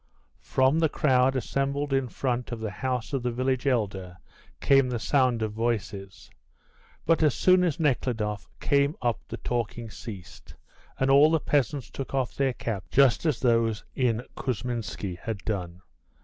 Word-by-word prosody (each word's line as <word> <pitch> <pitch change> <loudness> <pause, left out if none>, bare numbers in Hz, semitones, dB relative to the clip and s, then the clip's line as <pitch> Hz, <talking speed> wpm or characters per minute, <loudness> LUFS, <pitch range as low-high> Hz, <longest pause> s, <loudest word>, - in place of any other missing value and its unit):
From 130 +4 +2
the 160 -1 +3
crowd 130 -2 +2
assembled 140 +2 -1
in 135 -1 +1
front 125 -1 -2
of 120 - -4
the 110 -2 -4
house 125 +5 -3
of 135 - 0
the 125 - -1
village 130 +2 -1
elder 95 -8 -1 0.4
came 135 -2 +4
the 125 - -1
sound 125 -1 +1
of 110 - -2
voices; 105 -4 -3 0.7
but 165 +1 +3
as 150 -4 +3
soon 185 0 +4
as 170 -4 0
Nekhludoff 120 -8 -1
came 140 +2 +2
up 120 -2 +1
the - - -6
talking 120 -1 -3
ceased, 100 -4 -10 0.4
and 135 +1 +2
all 145 +3 +7
the 160 0 +2
peasants 145 -2 -1
took 135 0 -5
off 130 -3 -1
their 135 -2 0
caps, 110 -5 -4
just 135 +3 +4
as 150 - +1
those 115 -3 +2
in 120 -3 0
Kousminski 115 -7 -4
had 110 +3 -4
done. 90 -4 -4
125 Hz, 160 wpm, -27 LUFS, 110-135 Hz, 0.7 s, all